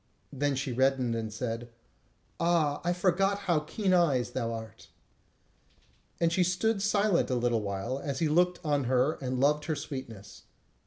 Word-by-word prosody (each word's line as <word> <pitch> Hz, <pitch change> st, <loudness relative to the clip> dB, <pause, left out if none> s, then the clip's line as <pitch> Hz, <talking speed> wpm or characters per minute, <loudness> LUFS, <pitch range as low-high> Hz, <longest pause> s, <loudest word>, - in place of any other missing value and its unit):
Then 140 Hz, 0 st, 0 dB
she 135 Hz, 0 st, -2 dB
reddened, 130 Hz, -1 st, +2 dB
and 110 Hz, -1 st, -3 dB
said: 115 Hz, +1 st, -4 dB, 0.7 s
"Ah, 165 Hz, -4 st, +1 dB
I 175 Hz, -, +1 dB
forgot 195 Hz, +3 st, +1 dB
how 170 Hz, -4 st, +3 dB
keen 185 Hz, +5 st, -1 dB
eyes 150 Hz, -9 st, +2 dB
thou 115 Hz, -3 st, -2 dB
art." 110 Hz, -1 st, -8 dB, 1.3 s
And 170 Hz, 0 st, +2 dB
she 185 Hz, -1 st, +3 dB
stood 195 Hz, +4 st, 0 dB
silent 205 Hz, -4 st, +2 dB
a 130 Hz, -, +1 dB
little 120 Hz, -2 st, +1 dB
while, 105 Hz, +6 st, -3 dB
as 140 Hz, -2 st, -4 dB
he 160 Hz, -, +1 dB
looked 180 Hz, +3 st, +3 dB
on 145 Hz, -3 st, +1 dB
her 130 Hz, +5 st, +1 dB
and 130 Hz, -1 st, -2 dB
loved 150 Hz, +2 st, +2 dB
her 155 Hz, -, -1 dB
sweetness. 130 Hz, -9 st, -8 dB
145 Hz, 160 wpm, -29 LUFS, 125-175 Hz, 1.3 s, how